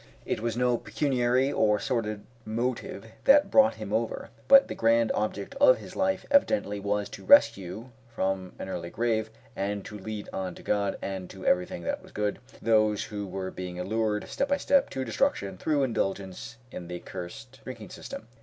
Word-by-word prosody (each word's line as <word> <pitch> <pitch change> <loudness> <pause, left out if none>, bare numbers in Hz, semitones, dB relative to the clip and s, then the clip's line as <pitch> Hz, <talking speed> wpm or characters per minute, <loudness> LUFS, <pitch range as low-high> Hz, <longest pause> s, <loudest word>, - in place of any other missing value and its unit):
It - - -1
was 115 +1 -2
no 125 -1 +2
pecuniary 125 +2 +1
or 105 -1 +3
sordid 110 -2 -2 0.2
motive 115 -1 -3 0.2
that 290 +2 +8
had - - -17
brought 275 0 +6
him - - -6
over; - - -2 0.2
but 275 0 +8
the - - -4
grand 115 0 +3
object 105 -1 -2
of - - +7
his - - -11
life 285 0 0
evidently 270 - +3
was 100 0 -1
to - - -10
rescue 110 - +4 0.2
from 95 -4 -2
an - - -6
early 85 -2 -4
grave, 110 0 0 0.3
and 100 0 -2
to 105 -1 -8
lead 105 +1 -6
on 95 -2 -3
to - - -13
God, 100 -1 0
and 95 -2 -4
to 95 -1 -10
everything 90 -1 +1
that - - -2
was - - -16
good, 105 -1 -2 0.2
those 110 -2 +3
who 105 -1 -5
were 95 0 -4
being 90 -1 -6
allured, 105 +2 -1
step 275 - -1
by 280 0 +2
step, 280 -1 +3
to 130 0 -3
destruction 100 -4 0
through 145 +8 +1
indulgence 100 -2 -3
in 85 - -7
the 90 0 -5
cursed 95 +10 -9
drinking 115 -5 -8
system. - - -8
110 Hz, 180 wpm, -28 LUFS, 95-125 Hz, 0.3 s, that